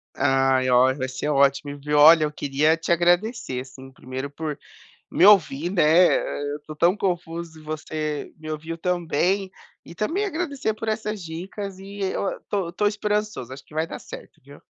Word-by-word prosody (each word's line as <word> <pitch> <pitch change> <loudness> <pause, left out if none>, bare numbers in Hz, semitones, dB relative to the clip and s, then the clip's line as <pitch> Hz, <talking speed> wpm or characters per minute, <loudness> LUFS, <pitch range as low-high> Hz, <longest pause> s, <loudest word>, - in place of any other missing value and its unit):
Ai, 135 -1 +2
ó, 125 +1 +5
vai 130 -1 -3
ser 130 +3 -4
ótimo, 140 0 +2
viu, 150 +1 -1
olha 155 +2 +8
eu 150 - -1
queria 150 +2 +1
te 165 +1 -4
agradecer, 175 - +1
assim, 130 +1 -12
primeiro 130 +1 -6
por 150 0 -5 0.5
me - - +3
ouvir, 175 -5 +4
né, 185 -2 +2 0.3
eh, 145 0 -3
eu 150 - -8
tô 155 - -8
tão 170 +5 +3
confuso 170 -4 -3
e - - -14
você 155 -1 -4
me 155 0 -8
ouviu 160 +2 -5
tão 180 0 -1
bem, 185 +5 0 0.3
e - - -12
também 320 - -1
agradecer 300 - -2
por 225 +1 -6
essas 215 -2 -3
dicas, 185 +4 -7
e 200 +1 -10
eu 190 -1 -1
o 195 - -3
tô 190 -4 -2
tô 210 +4 0
esperançoso, 210 - -2
acho 135 +1 -10
que - - -18
vai 160 +1 0
dar - - -7
certo, - - -12
viu. - - -15
160 Hz, 185 wpm, -24 LUFS, 145-195 Hz, 0.5 s, olha